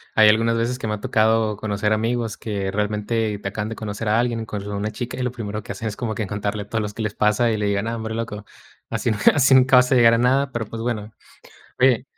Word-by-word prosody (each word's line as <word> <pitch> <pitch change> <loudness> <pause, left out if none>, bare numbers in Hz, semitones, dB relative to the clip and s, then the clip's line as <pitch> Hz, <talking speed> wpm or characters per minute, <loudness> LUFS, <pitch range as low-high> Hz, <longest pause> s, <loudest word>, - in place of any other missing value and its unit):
hay 110 -1 +7
algunas 115 +2 +3
veces 120 +2 -1
que 115 - -5
me 105 - -1
ha - - -9
tocado 110 0 +2
conocer 105 0 -1
amigos 115 +1 -1
que 100 -3 -3
realmente 105 +1 -1
te 100 - -5
acaban 105 +2 -4
de 115 - -5
conocer 105 0 -4
a 110 +2 +3
alguien, 120 -1 0
y - - -5
cuando 105 -1 -6
ve - - -3
una 105 +2 -2
chica 120 +3 -5
y 130 - -2
lo 125 - -1
primero 105 -3 -5
que - - -7
hacen 110 - -5
es 105 - -4
como 110 +1 -3
que 110 - -3
en - - -5
contarle 105 0 -3
todo 110 +2 -2
lo 105 - -3
que 105 +2 -7
les 105 -2 -2
pasa 105 +3 +2
y 110 - 0
le 105 -1 -1
digan: 100 +1 0
"Ah, 115 - -2
hombre 110 -1 -4
loco, 105 -2 -5 0.4
así 120 - -1
nunca 105 -1 +4
así 135 -2 +5
nunca 130 0 +6
vas 125 0 +4
a - - +5
llegar 115 -2 +6
a - - +3
nada,", 130 +3 +2
pero 120 -2 -3
pues 115 +2 -7
bueno. 110 -2 -3 0.7
Oye 130 -2 +4
110 Hz, 275 wpm, -22 LUFS, 105-115 Hz, 0.7 s, hay